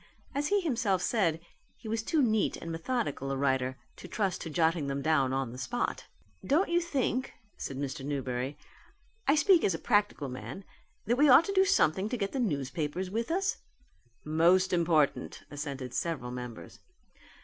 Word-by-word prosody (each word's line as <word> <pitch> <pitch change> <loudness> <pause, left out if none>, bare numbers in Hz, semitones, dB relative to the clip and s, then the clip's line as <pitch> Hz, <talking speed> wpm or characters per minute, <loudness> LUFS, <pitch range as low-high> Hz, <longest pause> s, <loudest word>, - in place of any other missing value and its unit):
As 290 +1 0
he 405 +3 +2
himself 235 - +1
said 170 -9 +1 0.4
he 225 - -11
was 225 +1 -1
too 300 +5 +1
neat 220 -3 +1
and 165 - -6
methodical 165 - -2
a 135 - -1
writer 130 -1 0 0.2
to - - -10
trust 195 -2 -1
to 165 - -5
jotting 160 -1 +1
them 140 0 -2
down 140 -4 +2
on 135 -3 -1
the 125 - -8
spot. 125 -1 -3 0.4
"Don't 325 +8 +2
you 345 0 +3
think," 265 -6 -1 0.2
said 135 - -5
Mr. 140 0 -4
Newberry, 135 -1 -3 0.7
"I 280 - +5
speak 330 +3 +5
as 190 - +2
a - - -3
practical 205 - +1
man, 130 +9 -7 0.4
that 240 +3 +1
we 295 0 +6
ought 280 +6 +8
to 395 - -2
do 380 0 +5
something 195 - +2
to 250 - -2
get 200 -2 -2
the 270 - -3
newspapers 160 - -2
with 230 +3 -2
us?" 380 +3 0 0.7
"Most 175 +5 +3
important," 165 -4 +1
assented 140 -4 -5
several 145 -8 -2
members. 125 -2 -8
170 Hz, 170 wpm, -30 LUFS, -, 0.7 s, ought